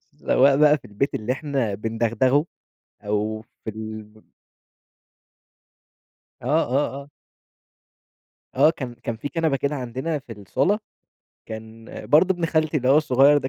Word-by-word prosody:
سواء 135 Hz, +1 st, +3 dB
بقى 150 Hz, 0 st, +6 dB
في -, -, -19 dB
البيت 105 Hz, +7 st, -2 dB
اللي 115 Hz, +4 st, -1 dB
إحنا 135 Hz, -7 st, -2 dB
بِندغدغه 115 Hz, +6 st, +1 dB, 0.6 s
أو 105 Hz, +1 st, -1 dB, 0.2 s
في -, -, -2 dB
ال 110 Hz, 0 st, -8 dB, 2.2 s
آه، -, -, -7 dB
آه، 135 Hz, +2 st, +1 dB
آه. 145 Hz, -, -18 dB, 1.4 s
آه، 145 Hz, +4 st, +6 dB
كان 130 Hz, -7 st, -6 dB
كان 115 Hz, -1 st, -5 dB
في 145 Hz, +6 st, -5 dB
كنبة 160 Hz, -3 st, 0 dB
كده 140 Hz, +2 st, -1 dB
عندنا 130 Hz, +5 st, -3 dB
في 125 Hz, -4 st, -11 dB
الصالة 110 Hz, -, 0 dB, 0.7 s
كان 110 Hz, +1 st, -9 dB, 0.2 s
برضه 170 Hz, +6 st, +5 dB
ابن 175 Hz, -2 st, -1 dB
خالتي 155 Hz, -1 st, +1 dB
اللي 130 Hz, -2 st, 0 dB
هو 135 Hz, -, +6 dB
الصغير 145 Hz, -1 st, +5 dB
ده 130 Hz, -2 st, -4 dB
130 Hz, 135 wpm, -23 LUFS, 110-145 Hz, 2.2 s, بقى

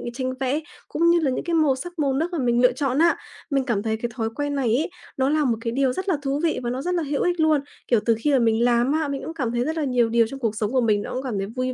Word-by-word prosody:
tranh 255 Hz, 0 st, -2 dB
vẽ 270 Hz, +3 st, 0 dB, 0.3 s
cũng 335 Hz, +2 st, +2 dB
như 340 Hz, 0 st, +5 dB
là 285 Hz, -5 st, +1 dB
những -, -, -2 dB
cái 345 Hz, -, -2 dB
màu 305 Hz, -4 st, +3 dB
sắc 350 Hz, +6 st, -8 dB
màu 280 Hz, -3 st, +1 dB
nước 320 Hz, +6 st, -1 dB
mà 335 Hz, -, -1 dB
mình 240 Hz, -1 st, +2 dB
lựa 250 Hz, -, +5 dB
chọn 265 Hz, +1 st, -1 dB
á. 335 Hz, +1 st, +4 dB, 0.3 s
Mình 275 Hz, -2 st, +1 dB
cảm 220 Hz, -6 st, -1 dB
thấy 220 Hz, -1 st, -1 dB
cái 235 Hz, +1 st, -4 dB
thói 225 Hz, -3 st, -1 dB
quen 290 Hz, 0 st, -2 dB
này 265 Hz, -4 st, 0 dB
ấy, 315 Hz, +6 st, -1 dB, 0.3 s
nó 265 Hz, 0 st, +2 dB
là 305 Hz, 0 st, +2 dB
một 235 Hz, -3 st, +1 dB
cái 230 Hz, 0 st, -2 dB
điều 265 Hz, 0 st, +1 dB
rất 380 Hz, +7 st, -3 dB
là 330 Hz, -, +2 dB
thú 275 Hz, 0 st, -1 dB
vị 330 Hz, -, +1 dB
và 240 Hz, -, -1 dB
nó 255 Hz, +2 st, -3 dB
rất 360 Hz, +4 st, -1 dB
là 340 Hz, -, 0 dB
hữu 285 Hz, -1 st, -1 dB
ích 355 Hz, -1 st, 0 dB
luôn. 310 Hz, -2 st, +3 dB, 0.3 s
Kiểu, 235 Hz, -, +3 dB
từ 230 Hz, -, +3 dB
khi 295 Hz, -, +1 dB
mà 270 Hz, -, +4 dB
mình 225 Hz, -1 st, +2 dB
làm 240 Hz, +2 st, +3 dB
á, 310 Hz, 0 st, 0 dB
mình 280 Hz, -1 st, -3 dB
cũng 325 Hz, -, -5 dB
cảm 260 Hz, -8 st, -2 dB
thấy 240 Hz, 0 st, 0 dB
rất 320 Hz, +1 st, -2 dB
là 315 Hz, -, 0 dB
nhiều 250 Hz, -4 st, +2 dB
điều 230 Hz, 0 st, +3 dB
trong 270 Hz, +4 st, -8 dB
cuộc 225 Hz, -4 st, -1 dB
sống 215 Hz, 0 st, -2 dB
của 260 Hz, -1 st, +2 dB
mình 215 Hz, -3 st, +2 dB
nó -, -, -6 dB
cũng 260 Hz, -, -3 dB
cảm 245 Hz, -6 st, -3 dB
thấy 195 Hz, 0 st, -2 dB
vui 255 Hz, +3 st, -3 dB
265 Hz, 330 wpm, -23 LUFS, 240-300 Hz, 0.3 s, như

